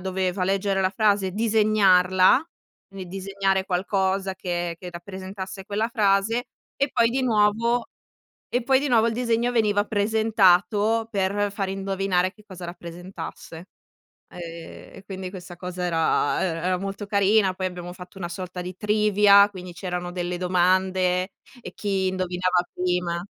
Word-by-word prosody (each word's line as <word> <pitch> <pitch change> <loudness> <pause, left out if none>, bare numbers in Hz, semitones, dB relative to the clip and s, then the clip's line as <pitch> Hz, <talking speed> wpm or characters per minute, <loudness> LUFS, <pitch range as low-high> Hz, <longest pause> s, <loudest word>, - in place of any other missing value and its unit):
doveva 185 0 -2
leggere 195 +1 0
la 185 0 +2
frase 205 -2 +2
e - - -7
disegnarla, 210 - +4 0.4
quindi 195 -2 -8
disegnare 195 +1 -1
qualcosa 190 +1 -1
che 175 -2 -3
che 180 -1 -7
rappresentasse 190 +2 -8
quella 210 +3 -1
frase, 220 +2 +1 0.3
e 280 - 0
poi 230 0 +3
di 260 +2 -1
nuovo 230 +1 +2 0.6
e 245 0 -1
poi 265 +2 +4
di 290 - -1
nuovo 230 -2 +4
il 230 - -1
disegno 235 0 0
veniva 210 -3 +2
presentato 215 0 +2
per 200 +1 0
fare 195 -2 -3
indovinare 195 -1 0
che 210 +1 -21
cosa 185 -2 -10
rappresentasse. 170 -1 -9 0.7
Ehm, 180 - -9 0.6
e 195 - -12
quindi 190 -2 -6
questa 180 -2 -10
cosa 180 0 -5
era 165 -4 +1
e - - +1
era 180 +2 -1
molto 195 +2 -5
carina. 200 -1 +3
Poi 185 0 -4
abbiamo 180 -1 -5
fatto 180 +2 -12
una 175 -2 -5
sorta 180 0 -6
di 180 +1 -7
Trivia, 210 -1 +5
quindi 180 -3 -9
c'erano 180 -1 -4
delle 175 0 -3
domande 185 +1 +1 0.3
e - - -9
chi 195 -2 -1
indovinava 185 -1 0
prima 180 -1 -1
190 Hz, 145 wpm, -24 LUFS, 180-210 Hz, 0.7 s, Trivia